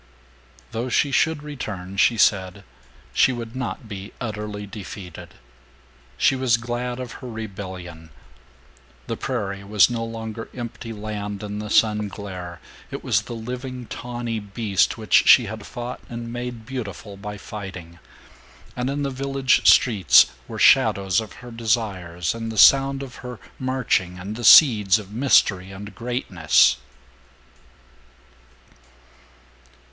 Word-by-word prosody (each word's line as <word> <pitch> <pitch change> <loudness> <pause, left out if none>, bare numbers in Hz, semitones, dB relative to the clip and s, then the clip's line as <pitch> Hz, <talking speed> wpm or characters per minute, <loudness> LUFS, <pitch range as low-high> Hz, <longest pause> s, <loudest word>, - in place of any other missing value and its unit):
Though 120 +3 -3
she 140 +3 +2
should 160 +1 +1
return, 100 -11 -6
she 115 +4 +3
said, 100 -1 +2 0.5
she 130 - +4
would 120 -1 -6
not 115 -3 -5
be 100 -1 -8
utterly 105 -3 -5
defeated. 100 -4 -9 0.8
She 135 - +3
was 130 -3 +2
glad 120 +1 -4
of 125 -2 -6
her 125 - -7
rebellion. 95 -7 -8 1.0
The - - -3
prairie 100 0 -4
was 105 +3 +4
no 115 -1 -2
longer 115 0 -6
empty 120 -1 -7
land 105 -1 -5
in 105 0 -5
the 105 0 -6
sun 105 0 +3
glare; 95 -3 -8 0.3
it - - -7
was - - +2
the 120 - -8
living 125 +2 -6
tawny 120 -1 -5
beast 100 0 0
which 110 -1 +3
she 125 - +8
had 110 0 -7
fought 120 0 -6
and 115 0 -6
made 120 -2 -6
beautiful 110 -5 -6
by 105 +1 -7
fighting; 90 -5 -9 0.8
and 125 +1 -2
in 145 +1 -2
the 140 - -2
village 135 0 +1
streets 105 - +6 0.2
were - - -7
shadows 95 +1 +4
of 110 -3 -9
her 120 - -9
desires 100 -7 -1
and 115 0 -5
the 110 - -7
sound 135 +4 +6
of 130 -2 -10
her 125 -2 -8 0.2
marching 125 -9 0
and 100 +4 -6
the 120 - -7
seeds 110 - +7
of 105 -2 -10
mystery 105 -7 +3
and 100 +1 -9
greatness. 90 - +2
110 Hz, 135 wpm, -23 LUFS, 100-120 Hz, 1.0 s, she